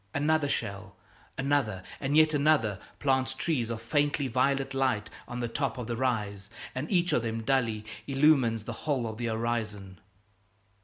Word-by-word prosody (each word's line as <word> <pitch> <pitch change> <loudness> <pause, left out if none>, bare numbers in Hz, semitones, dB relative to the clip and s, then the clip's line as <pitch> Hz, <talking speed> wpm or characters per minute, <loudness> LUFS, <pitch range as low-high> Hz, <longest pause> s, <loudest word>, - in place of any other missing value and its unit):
Another 150 0 +2
shell 100 -4 -3 0.4
another 135 -9 0 0.2
and 145 +2 +1
yet 155 0 +6
another 140 -9 +3 0.2
plant 130 -2 +1
trees 130 -9 0
of 115 -1 -4
faintly 145 +2 +1
violet 135 +3 +1
light 130 -6 0 0.2
on 125 0 -5
the 120 - -1
top 130 +1 -2
of 125 - -4
the 120 +1 -3
rise, 105 -6 -1 0.2
and 130 +5 -4
each 175 -2 +2
of - - +3
them 115 0 -3
dully 115 -5 +1 0.2
illumines 135 -6 +3
the - - -5 0.2
whole 130 -5 +1
of 110 -1 -5
the 120 0 -2
horizon. 110 -5 -3
125 Hz, 160 wpm, -29 LUFS, 110-140 Hz, 0.4 s, yet